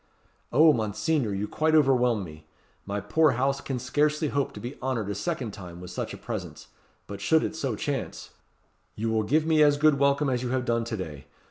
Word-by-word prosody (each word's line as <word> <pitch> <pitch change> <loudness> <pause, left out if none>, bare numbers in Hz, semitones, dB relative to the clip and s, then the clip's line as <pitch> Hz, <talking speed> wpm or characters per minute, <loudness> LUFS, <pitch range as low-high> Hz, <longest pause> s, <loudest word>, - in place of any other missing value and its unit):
"Oh, 155 +4 +6
Monseigneur! 110 +3 0
you 100 +2 -2
quite 155 +5 +1
overwhelm 125 -7 +3
me. 80 -2 -12 0.4
My 100 +1 -2
poor 140 +9 +3
house 135 +3 0
can 135 - -3
scarcely 150 +4 0
hope 140 -1 -1
to - - -8
be 120 +4 -7
honoured 115 -6 -2
a - - -1
second 105 +3 -3
time 90 -4 -10
with 90 0 -9
such - - -4
a - - -7
presence; - - -7 0.4
but 100 - -8
should 160 -1 +3
it - - -3
so 135 -7 -2
chance" 140 +5 -4 0.6
"You 110 +1 -2
will 110 -1 +2
give 150 +9 +1
me 160 -1 +3
as 145 -1 +5
good 150 -1 +4
welcome 140 +1 +3
as 125 -2 0
you 125 - -3
have 130 0 -1
done 115 -1 0
to 115 -1 -4
day. 75 -7 -7
125 Hz, 210 wpm, -27 LUFS, 105-145 Hz, 0.6 s, Oh